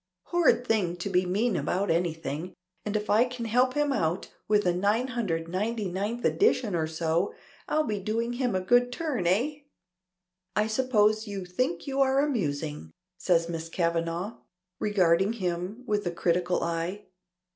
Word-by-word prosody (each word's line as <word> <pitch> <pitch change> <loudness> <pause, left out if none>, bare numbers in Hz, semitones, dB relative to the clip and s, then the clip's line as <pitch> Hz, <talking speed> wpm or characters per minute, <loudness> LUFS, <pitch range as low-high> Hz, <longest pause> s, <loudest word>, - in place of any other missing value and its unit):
Horrid 345 -7 +3
thing 200 -7 +1
to 185 +3 -4
be 180 0 +2
mean 210 +4 +1
about 195 +1 0
anything, 165 -1 -2 0.3
and 210 0 -3
if 210 0 -1
I 215 +3 +5
can 245 -2 -5
help 250 +4 +2
him 295 -1 +2
out 170 -5 -1
with 210 -1 +3
a 180 - +3
999th 205 0 -1
edition 255 - +2
or 160 -2 0
so, 160 +3 -1 0.3
I'll 310 - +2
be 210 -7 -2
doing 230 +4 -1
him 245 -4 0
a 185 - +1
good 245 +6 +3
turn. 255 - -2
Eh?" 255 - +1 1.0
"I 210 - +3
suppose 215 -2 +2
you 195 -2 -5
think 180 -1 -2
you 275 0 0
are 265 0 +3
amusing," 155 - -1 0.3
says 170 -2 +2
Miss 165 -1 -5
Kavanagh, 170 +4 -1 0.4
regarding 190 0 +3
him 185 +2 -3
with 210 -3 0
a - - 0
critical 175 +1 0
eye. 170 +5 -3
205 Hz, 150 wpm, -28 LUFS, 175-235 Hz, 1.0 s, I